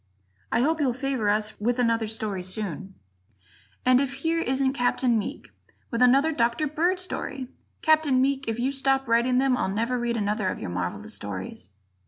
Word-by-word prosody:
I - - +2
hope 315 +4 +1
you'll 255 -4 +1
favor 260 -5 -1
us 215 +1 0
with 240 +3 +1
another 230 -2 +1
story 215 -3 -2
very - - -9
soon. 195 -1 -4 0.9
And 255 +1 +5
if 275 -1 -1
here 330 0 +1
isn't 265 -3 +1
Capt. 245 0 0
Meek 235 -4 -1 0.4
with 235 0 -1
another 270 +5 +5
Dr. 235 +1 +1
Bird 335 +5 0
story! 275 -8 -4 0.3
Captain 310 -4 +4
Meek, 275 +1 +1
if 225 0 -1
you 255 +3 0
stop 270 -1 +1
writing 235 +2 +3
them, 265 -1 +3
I'll 220 - -1
never 230 +5 -1
read 240 -1 -1
another 210 -2 0
of - - -3
your 90 - -5
marvelous 90 +4 -4
stories. 95 -2 -6
245 Hz, 180 wpm, -26 LUFS, 215-270 Hz, 0.9 s, And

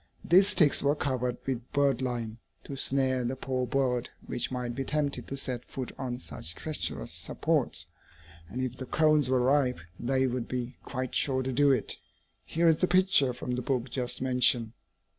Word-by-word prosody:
These 190 +4 +6
sticks 165 -8 +5
were 145 +1 +2
covered 125 -4 -1
with 125 -2 -4
birdlime, 125 -5 0 0.3
to 140 - -7
snare 130 -1 +1
the 125 +2 -2
poor 130 -1 -2
bird 125 -2 0 0.2
which 120 -1 0
might 125 -2 -3
be 135 +2 -3
tempted 145 0 -1
to 135 - -5
set 125 -3 -3
foot 130 -2 -5
on 125 -2 -4
such 85 -3 -5
treacherous 150 - -3
supports; - - -1 0.6
and 130 +3 -3
if 130 0 -4
the 130 - -6
cones 155 -3 +3
were 130 -1 +3
ripe, 130 0 +2 0.2
they 130 +2 +1
would 125 -2 -2
be 125 0 -4
quite 130 -2 -4
sure 130 -2 +1
to 130 - -2
do 145 +3 +4
it. 120 -7 0 0.5
Here 170 +1 +1
is 160 -1 +5
the 185 - +2
picture, 185 -7 +4
from 125 +1 -5
the 125 0 -1
book 125 -1 -2
just 125 0 -2
mentioned. 125 -3 +2
130 Hz, 180 wpm, -29 LUFS, 125-140 Hz, 0.6 s, These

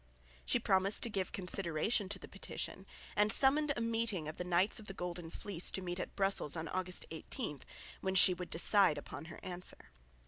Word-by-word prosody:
She - - +2
promised 190 +2 +2
to 235 - -1
give 190 -2 -2
consideration 185 +2 0
to 200 - -1
the 180 - -11
petition, 195 0 -6 0.3
and 210 +1 +3
summoned 285 +4 +6
a - - -2
meeting 225 -7 -1
of 155 - -7
the - - -3
Knights 180 +4 +1
of 215 - -13
the 195 - -8
Golden 175 -2 -5
Fleece 180 0 -3
to 190 - -4
meet 175 0 -4
at - - -6
Brussels 195 -6 +1
on 160 0 -4
August 185 -1 0
18, 160 - -5 0.4
when 190 0 -2
she 185 0 +8
would 180 0 -7
decide 185 -1 +4
upon 145 +1 -8
her 160 - -10
answer. 180 0 -4
185 Hz, 195 wpm, -34 LUFS, 175-205 Hz, 0.4 s, she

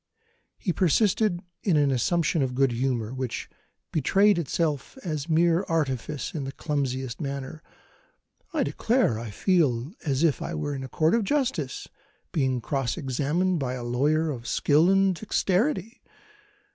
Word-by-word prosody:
He 180 - -1
persisted 190 +1 +2 0.2
in 180 -7 +2
an 145 -2 +3
assumption 160 +5 +1
of 130 -2 -1
good 135 -1 +3
humour, 120 -2 -1
which 130 -2 -4 0.5
betrayed 195 +6 +4
itself 155 - -2
as 155 -3 -3
mere 165 +2 +3
artifice 145 -3 -2
in 150 - -3
the 135 - -4
clumsiest 135 -3 -3
manner: 140 +2 -5 0.9
"I 315 -5 +1
declare 230 - +1
I 115 -1 -6
feel 140 - +1
as 140 -1 0
if 160 -4 +2
I 170 - -4
were 145 -2 -2
in 135 -1 -5
a 130 - -7
court 160 +4 +2
of 230 -1 +3
justice, 235 - -1 0.4
being 130 -5 0
cross 135 +2 -2
examined 155 +5 0
by 130 -3 -2
a 125 - -6
lawyer 150 +6 +1
of 120 -4 -7
skill 155 +4 +3
and 195 0 +4
dexterity! 215 - 0
150 Hz, 145 wpm, -26 LUFS, 130-175 Hz, 0.9 s, betrayed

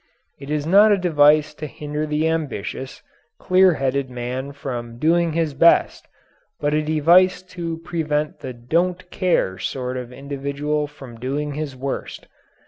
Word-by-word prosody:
It 140 0 -10
is 150 -1 -1
not 200 +6 +6
a 205 - +4
device 155 -3 +4
to 155 0 -6
hinder 150 +1 -4
the 150 +1 0
ambitious, 135 -5 -4 0.3
clear 185 -2 +4
headed 135 -1 -1
man 125 +2 -5
from 120 -4 -6
doing 165 +3 +2
his 160 -2 0
best, 165 +5 +3 0.5
but 145 0 0
a 155 - +2
device 170 +5 +4
to 165 -2 -4
prevent 155 -3 -2
the 130 - -6
don't 175 +9 -1
care 135 - 0
sort 125 +3 -3
of 125 -1 -6
individual 140 +2 -3
from 135 -5 -12
doing 145 +4 -3
his 145 -2 -5
worst. 135 +1 -5
150 Hz, 145 wpm, -22 LUFS, 135-165 Hz, 0.5 s, not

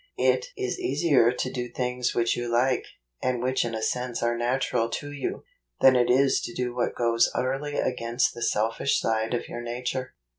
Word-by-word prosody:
It 465 - +2
is 390 -1 -2
easier 155 - +3
to 130 +1 -3
do 125 -1 -4
things 125 0 -2
which 115 -1 +2
you 120 -1 -3
like, 125 +2 +2 0.4
and 130 -1 0
which 130 +2 +1
in 115 -1 -3
a 110 - -3
sense 125 0 -2
are 120 0 +1
natural 120 -1 0
to 145 +5 -5
you, 145 -2 -4 0.4
than 130 -1 +7
it 125 -1 +3
is 135 +2 +4
to 120 - -6
do 125 -1 -2
what 125 - -1
goes 115 -1 +3
utterly 135 +3 -1
against 115 +2 0
the 120 - -9
selfish 115 +5 +1
side 110 +1 0
of 120 - -3
your 120 - -6
nature. 125 +2 -4
125 Hz, 190 wpm, -26 LUFS, 120-130 Hz, 0.4 s, than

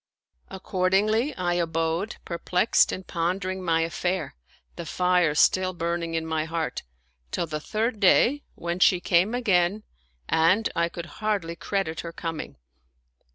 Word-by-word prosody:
Accordingly 195 +7 +1
I 175 -4 -1
abode, 165 +3 -1
perplexed 180 +4 +2
and 185 - -6
pondering 185 +2 -2
my 165 -2 +2
affair, 175 +1 -2 0.4
the 170 - -7
fire 180 -4 +2
still 185 +4 +3
burning 170 -1 -2
in 160 0 -1
my 160 -1 -1
heart, 160 -4 -3 0.5
till 170 - -2
the 155 -2 -4
third 215 +7 -2
day, 240 +8 +4
when 170 +1 -4
she 180 0 +5
came 185 +5 +2
again 200 -3 +1 0.4
and 185 +7 +3
I 170 0 +1
could 170 0 -7 0.2
hardly 200 -6 -1
credit 180 -4 -2
her 170 - -5
coming. 165 - -6
175 Hz, 135 wpm, -25 LUFS, 165-190 Hz, 0.5 s, she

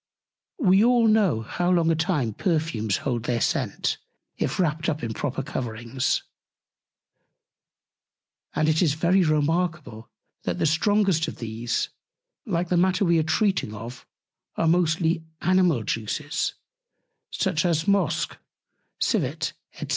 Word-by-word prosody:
We 195 - +4
all 240 -1 +4
know 205 - +3
how 175 +10 -1
long 170 -2 +3
a - - +2
time 155 - 0
Perfumes 155 - 0
hold 120 -4 -1
their 120 -1 0
Scent, - - -1 0.4
if - - -2
wrapt 160 -1 0
up 155 -3 -3
in 115 -1 -2
proper 135 +2 -3
Coverings: 120 -1 -2 2.3
And 155 - +2
it 155 0 +3
is 155 -5 +2
very 175 +4 +3
remarkable, 155 -6 -1 0.3
that - - -2
the - - +1
strongest 175 +1 +2
of - - -5
these, 115 +1 -2 0.6
like 175 -3 -1
the 180 - +2
Matter 185 +2 +3
we 170 -1 +3
are - - +3
treating 160 - 0
of, 115 +4 -9 0.5
are 165 - +1
mostly 165 -1 +2 0.2
Animal 180 -9 +3
Juices, 115 +8 -2 0.9
as 165 -2 +1
Mosch, 175 -6 +2 0.7
Civet, - - 0 0.2
&c. - - -7
160 Hz, 125 wpm, -25 LUFS, 130-180 Hz, 2.3 s, We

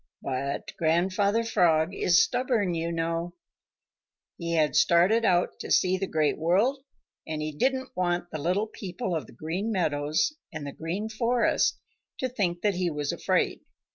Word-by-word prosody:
But 135 +1 -3
Grandfather 185 +7 +2
Frog 175 -6 +2
is 175 0 +4
stubborn, 240 -7 0
you 165 0 -2
know. 165 +1 -2 1.0
He 170 -1 -3
had 155 -2 +2
started 190 +7 +4
out 175 -2 +2
to - - -6
see 185 0 +3
the 190 +1 -2
Great 155 -3 0
World, 210 - +2 0.4
and 155 -1 -3
he 155 0 -3
didn't 260 - -1
want 175 -1 -1
the 155 - -4
little 180 +8 0
people 195 -2 -5
of 155 - -4
the - - -15
Green 170 - -3
Meadows 155 - 0 0.2
and 150 -3 -6
the 140 - -5
Green 180 +7 -4
Forest 235 +2 +1 0.4
to 260 - -1
think 185 -8 -2
that 205 -1 +2
he 180 -1 0
was 150 -2 -2
afraid. - - 0
175 Hz, 160 wpm, -27 LUFS, 160-210 Hz, 1.0 s, is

